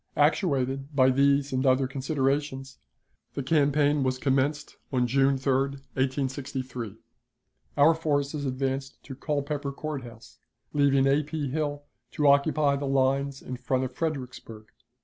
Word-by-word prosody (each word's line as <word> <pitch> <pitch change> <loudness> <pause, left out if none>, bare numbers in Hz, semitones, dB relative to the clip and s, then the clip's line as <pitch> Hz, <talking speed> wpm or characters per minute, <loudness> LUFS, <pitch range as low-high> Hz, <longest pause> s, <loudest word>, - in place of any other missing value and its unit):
Actuated 140 -3 +1
by 130 -1 +5
these 140 +1 +2
and 130 0 0
other 130 0 +3
considerations, 135 0 -2 0.6
the 140 - -2
campaign 145 0 +2
was 130 -1 0
commenced 140 +3 0
on 125 -2 +2
June 135 +2 +2
3, 135 0 0
1863. 135 -3 -3 0.8
Our 145 +3 +6
forces 145 -2 -1
advanced 135 +1 -3
to 135 - -8
Culpeper 145 0 -3
Court 150 0 -5
House, 115 -2 -13 0.3
leaving 140 -2 +3
A. 140 +2 +3
P. 150 -1 -4
Hill 145 -1 -2 0.3
to 150 - 0
occupy 140 0 +3
the 140 0 -3
lines 135 +1 +1
in 130 - -6
front 130 +1 -1
of 130 -1 -4
Fredericksburg. 125 -7 -5
140 Hz, 130 wpm, -27 LUFS, 130-145 Hz, 0.8 s, Our